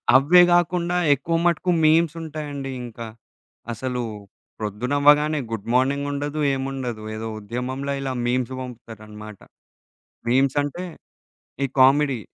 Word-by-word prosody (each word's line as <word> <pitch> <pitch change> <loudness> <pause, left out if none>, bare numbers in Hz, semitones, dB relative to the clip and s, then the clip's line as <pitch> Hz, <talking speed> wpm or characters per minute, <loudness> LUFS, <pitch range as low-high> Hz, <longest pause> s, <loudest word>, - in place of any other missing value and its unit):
అవే 150 +7 +7
గాకుండా 175 0 +2 0.2
ఎక్కువ 145 +5 -2
మటుకు 175 +1 +1
మీమ్స్ 160 0 +4
ఉంటాయండి 145 -3 -5
ఇంకా. 115 -1 -8 0.6
అసలు 125 +2 -3 0.6
ప్రొద్దున 110 +5 -3
అవ్వగానే 150 +1 +4
గుడ్ 115 -2 -5
మార్నింగ్ 140 +3 +1
ఉండదు 145 +2 -3
ఏముండదు. 135 -4 -4
ఏదో 110 +1 -5
ఉద్యమంల 130 +6 -4
ఇలా 135 -1 -3
మీమ్స్ 125 +1 0
పంపుతారన్నమాట. 110 -4 -10 0.9
మీమ్‌సంటే 140 +6 +1 0.8
ఈ - - +3
కామెడీ 135 -1 +4
135 Hz, 105 wpm, -23 LUFS, 120-150 Hz, 0.9 s, అవే